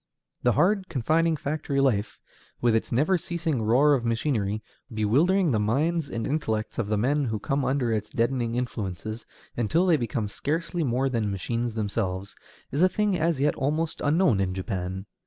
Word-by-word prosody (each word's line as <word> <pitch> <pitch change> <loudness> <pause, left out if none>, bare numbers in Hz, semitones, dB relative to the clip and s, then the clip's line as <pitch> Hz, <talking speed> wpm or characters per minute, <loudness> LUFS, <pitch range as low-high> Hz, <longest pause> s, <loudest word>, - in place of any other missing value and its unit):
The 125 - +3
hard, 190 - +2
confining 160 +4 +1
factory 145 -1 -2
life, 115 -6 +1 0.4
with 120 -2 +3
its 115 - -1
never 155 +10 +2
ceasing 165 -6 -2
roar 130 +7 +4
of 130 -4 +1
machinery, 115 -3 -1 0.3
bewildering 150 - +2
the 110 - +2
minds 145 +8 0
and 115 -1 -3
intellects 110 -8 -2
of 115 - -1
the 105 0 0
men 140 +6 +1
who 110 -3 -1
come 135 +5 -1
under 130 -3 0
its 105 -1 -2
deadening 120 0 0
influences, 110 -2 -4 0.3
until 140 - +2
they 170 -4 +4
become 115 -3 -2
scarcely 165 - -2
more 130 0 +1
than 115 -5 -1
machines 115 +4 -2
themselves, 100 -3 -2 0.4
is 140 - 0
a 185 - +6
thing 210 0 +1
as 165 -3 +1
yet 145 +2 +2
almost 155 +4 -1
unknown 150 - +3
in 95 -1 -1
Japan. 95 -1 -4
125 Hz, 170 wpm, -26 LUFS, 110-155 Hz, 0.4 s, a